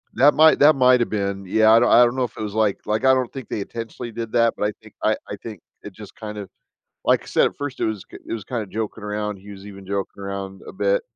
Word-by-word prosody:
That 145 Hz, +2 st, +5 dB
might 160 Hz, +1 st, +6 dB
that 150 Hz, +1 st, +7 dB
might've 125 Hz, -2 st, +4 dB
been. 100 Hz, -2 st, -2 dB
Yeah, 110 Hz, +3 st, +4 dB
I 115 Hz, -, +7 dB
don't 120 Hz, -, +3 dB
I 120 Hz, -, +7 dB
don't 120 Hz, +1 st, +1 dB
know 130 Hz, -, 0 dB
if 120 Hz, -, -5 dB
it -, -, -6 dB
was 105 Hz, -1 st, -5 dB
like 110 Hz, -3 st, +1 dB
like, 110 Hz, +4 st, -1 dB
I 130 Hz, 0 st, +6 dB
don't 130 Hz, -2 st, 0 dB
think 135 Hz, -3 st, -8 dB
they 105 Hz, -, -3 dB
intentionally 115 Hz, +2 st, -7 dB
did 115 Hz, 0 st, -6 dB
that, 115 Hz, -1 st, +3 dB
but 105 Hz, -, 0 dB
I -, -, -2 dB
think 110 Hz, -2 st, -16 dB
I 110 Hz, -, +3 dB
I 100 Hz, -, -4 dB
think 105 Hz, -6 st, -9 dB, 0.2 s
it -, -, -10 dB
just -, -, -12 dB
kind 105 Hz, -1 st, -7 dB
of 100 Hz, -3 st, -7 dB, 0.6 s
like -, -, +2 dB
said, -, -, +3 dB
at -, -, -4 dB
first 145 Hz, -2 st, -5 dB
it -, -, +1 dB
was 110 Hz, -3 st, -3 dB
k -, -, -13 dB
it -, -, -6 dB
was 110 Hz, -3 st, -4 dB
kinda 115 Hz, -5 st, -4 dB
joking 110 Hz, +1 st, -5 dB
around. 105 Hz, -1 st, -3 dB
He 100 Hz, +2 st, -13 dB
was 100 Hz, 0 st, -11 dB
even 100 Hz, -2 st, -11 dB
joking 100 Hz, 0 st, -4 dB
around 100 Hz, 0 st, -6 dB
a -, -, -8 dB
bit, -, -, +1 dB
110 Hz, 280 wpm, -22 LUFS, 100-120 Hz, 0.6 s, that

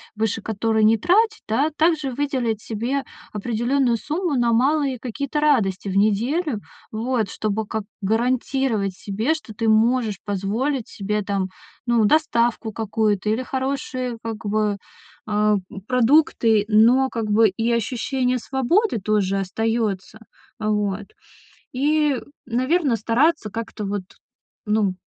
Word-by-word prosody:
выше 220 Hz, 0 st, -1 dB
которой 220 Hz, +1 st, 0 dB
не 225 Hz, +1 st, +5 dB
тратить, 435 Hz, -, +2 dB
да, 275 Hz, +8 st, +2 dB
также 310 Hz, -4 st, +2 dB
выделить 245 Hz, -5 st, -1 dB
себе 240 Hz, +5 st, -2 dB, 0.3 s
определённую 240 Hz, +3 st, 0 dB
сумму 320 Hz, -, -2 dB
на 235 Hz, -1 st, +2 dB
малые 270 Hz, +1 st, +2 dB
какие-то 280 Hz, +4 st, -3 dB
радости 205 Hz, -10 st, +2 dB
в 195 Hz, -, -1 dB
неделю, 230 Hz, -, +1 dB, 0.3 s
вот, 225 Hz, -2 st, -1 dB
чтобы 215 Hz, 0 st, -2 dB
как 220 Hz, 0 st, -3 dB, 0.2 s
гарантировать 230 Hz, -1 st, 0 dB
себе, 220 Hz, +12 st, -1 dB
что 305 Hz, -8 st, -8 dB
ты 225 Hz, +2 st, -2 dB
можешь 220 Hz, -2 st, +2 dB
позволить 220 Hz, +6 st, -2 dB
себе, 210 Hz, +1 st, -3 dB
там, 195 Hz, -2 st, -1 dB, 0.4 s
ну, 235 Hz, -3 st, +3 dB
доставку 235 Hz, -5 st, +2 dB
какую-то 215 Hz, -1 st, 0 dB
или 230 Hz, +4 st, 0 dB
хорошие, 260 Hz, -2 st, -3 dB
как 225 Hz, -1 st, -6 dB
бы, 210 Hz, 0 st, 0 dB, 0.5 s
а, 210 Hz, 0 st, +3 dB
м, 195 Hz, -, -9 dB
продукты, 250 Hz, -4 st, +3 dB
но, 240 Hz, +5 st, +5 dB
как 230 Hz, -2 st, -3 dB
бы, 215 Hz, 0 st, +5 dB
и 225 Hz, +5 st, -2 dB
ощущение 250 Hz, +2 st, 0 dB
свободы 270 Hz, -, +1 dB
тоже 195 Hz, -1 st, +1 dB
остаётся, 220 Hz, 0 st, -2 dB, 0.4 s
вот. 210 Hz, -1 st, -1 dB, 0.7 s
И, 295 Hz, +1 st, +2 dB, 0.3 s
наверно, 255 Hz, +2 st, +1 dB
стараться 235 Hz, +4 st, +1 dB
как-то 220 Hz, -1 st, -5 dB
вот, 200 Hz, 0 st, -2 dB, 0.6 s
ну, 210 Hz, -3 st, +1 dB
230 Hz, 125 wpm, -22 LUFS, 210-265 Hz, 0.7 s, не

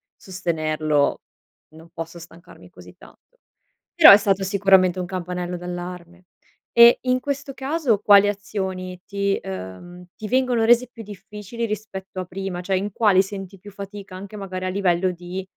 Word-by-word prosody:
sostenerlo 155 Hz, -5 st, -1 dB, 0.5 s
non 165 Hz, +1 st, -15 dB
posso 165 Hz, +1 st, -7 dB
stancarmi 170 Hz, +1 st, -15 dB
così -, -, -15 dB
tanto." -, -, -20 dB, 0.6 s
Però, 340 Hz, -, +10 dB
è -, -, +10 dB
stato 195 Hz, -1 st, 0 dB
sicuramente 190 Hz, -2 st, +3 dB
un 180 Hz, -, -3 dB
campanello 180 Hz, -1 st, -4 dB
d'allarme. 175 Hz, 0 st, -8 dB, 0.5 s
E 235 Hz, 0 st, +8 dB
in 255 Hz, 0 st, +1 dB
questo 280 Hz, 0 st, -4 dB
caso 270 Hz, -5 st, 0 dB
quali 205 Hz, -1 st, +6 dB
azioni 190 Hz, -3 st, -4 dB
ti 200 Hz, -1 st, -1 dB
ehm, 95 Hz, -, -9 dB
ti 215 Hz, -, -7 dB
vengono 250 Hz, -2 st, +1 dB
rese 240 Hz, +1 st, +4 dB
più 230 Hz, -, -10 dB
difficili, 210 Hz, +2 st, -8 dB
rispetto 195 Hz, -3 st, -6 dB
a 185 Hz, -, -5 dB
prima? 190 Hz, 0 st, -5 dB
Cioè, 190 Hz, +1 st, -1 dB
in 200 Hz, +2 st, -3 dB
quali 200 Hz, -3 st, +4 dB
senti 195 Hz, -1 st, -8 dB
più 205 Hz, +3 st, -13 dB
fatica, 200 Hz, -1 st, -9 dB
anche 200 Hz, +2 st, -9 dB
magari 185 Hz, -2 st, -5 dB
a -, -, -1 dB
livello 185 Hz, -1 st, +1 dB
di, 180 Hz, +1 st, -6 dB
190 Hz, 155 wpm, -22 LUFS, 180-210 Hz, 0.6 s, Però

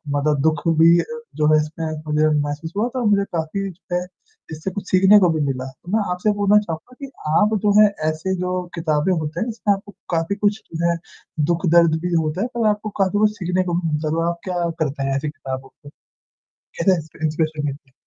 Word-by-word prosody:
मतलब 145 Hz, 0 st, +1 dB
दुःख 155 Hz, -1 st, +1 dB, 0.2 s
भी 170 Hz, +1 st, +7 dB
अ, -, -, 0 dB, 0.3 s
जो 150 Hz, -1 st, +2 dB
है -, -, +6 dB
इसमें 160 Hz, +2 st, -5 dB, 0.2 s
मुझे 150 Hz, +1 st, +2 dB
महसूस 145 Hz, +3 st, -4 dB
हुआ 230 Hz, +3 st, +2 dB
था, 250 Hz, -, -1 dB
मुझे 200 Hz, -1 st, +3 dB
काफ़ी 175 Hz, +5 st, -2 dB
जो 175 Hz, 0 st, -7 dB
है 180 Hz, 0 st, -1 dB, 0.5 s
जिससे 160 Hz, +5 st, -4 dB
कुछ 200 Hz, +1 st, -6 dB
सीखने 190 Hz, +3 st, +7 dB
को 180 Hz, -, +4 dB
भी 155 Hz, -, -1 dB
मिला। 130 Hz, -2 st, -2 dB, 0.3 s
मैं 220 Hz, -, +4 dB
आपसे 180 Hz, +4 st, +1 dB
बोलना 205 Hz, +1 st, +5 dB
चहूँगा 165 Hz, +8 st, -7 dB
कि 275 Hz, -, -6 dB, 0.3 s
आप 215 Hz, +1 st, +3 dB
जो 205 Hz, -, +4 dB
है 210 Hz, -, +8 dB, 0.2 s
ऐसे 175 Hz, +5 st, -2 dB
जो 180 Hz, 0 st, -1 dB
किताबें 160 Hz, +1 st, +1 dB
होते 155 Hz, -2 st, -3 dB
हैं 225 Hz, -, -1 dB
इसमें 215 Hz, -2 st, +1 dB
आपको 200 Hz, +1 st, -7 dB, 0.2 s
काफ़ी 165 Hz, +4 st, 0 dB
कुछ 205 Hz, +1 st, 0 dB
जो 170 Hz, +1 st, +1 dB
है 170 Hz, -, +1 dB, 0.6 s
दुःख-दर्द 170 Hz, -1 st, +4 dB
भी 180 Hz, 0 st, -2 dB
होता 160 Hz, +3 st, 0 dB
है 235 Hz, -, 0 dB
पर 230 Hz, -2 st, +2 dB
आपको 210 Hz, +1 st, -2 dB
काफ़ी 195 Hz, +2 st, +2 dB
कुछ 215 Hz, 0 st, +4 dB
सीखने 180 Hz, 0 st, 0 dB
को 175 Hz, -2 st, -3 dB
भी 165 Hz, -, -1 dB
मिलता 150 Hz, +1 st, -1 dB
है, 170 Hz, -, +1 dB
आप 170 Hz, 0 st, -4 dB
क्या 175 Hz, -2 st, -1 dB
करते 140 Hz, -3 st, -1 dB
हैं 135 Hz, 0 st, 0 dB
ऐसी 140 Hz, +2 st, -2 dB
किताबों 135 Hz, -2 st, -7 dB
को? 145 Hz, -, -16 dB, 0.7 s
कैसे 185 Hz, +2 st, 0 dB
इंस्प्री 160 Hz, 0 st, -6 dB
इन्सपिरेसन 155 Hz, -1 st, -1 dB
मिलती। 140 Hz, -1 st, -6 dB
170 Hz, 215 wpm, -21 LUFS, 155-195 Hz, 0.7 s, है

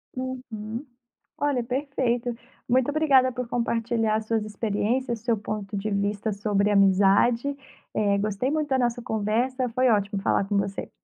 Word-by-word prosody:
Uhum. 250 Hz, -2 st, -5 dB, 0.5 s
Olha, 285 Hz, -4 st, +1 dB
perfeito. 245 Hz, -2 st, -1 dB, 0.3 s
Muito 255 Hz, +2 st, +2 dB
obrigada 280 Hz, -4 st, +4 dB
por 250 Hz, -1 st, -4 dB
compartilhar 230 Hz, -2 st, 0 dB
as 220 Hz, 0 st, -2 dB
suas 225 Hz, -1 st, 0 dB
experiências, 225 Hz, +3 st, -1 dB
seu 230 Hz, 0 st, 0 dB
ponto 205 Hz, -1 st, -4 dB
de 205 Hz, +2 st, -2 dB
vista 200 Hz, +2 st, -1 dB
sobre 205 Hz, 0 st, +1 dB
amizade. 200 Hz, +7 st, +4 dB, 0.4 s
Eh, 200 Hz, -1 st, +2 dB
gostei 210 Hz, +5 st, -1 dB
muito 305 Hz, -1 st, -1 dB
da 265 Hz, -1 st, +2 dB
nossa 240 Hz, -1 st, 0 dB
conversa, 240 Hz, +4 st, -1 dB
foi 255 Hz, +2 st, +2 dB
ótimo 200 Hz, -2 st, +1 dB
falar 195 Hz, -, +1 dB
com 200 Hz, +1 st, 0 dB
você. 195 Hz, 0 st, -2 dB
230 Hz, 145 wpm, -25 LUFS, 205-255 Hz, 0.5 s, obrigada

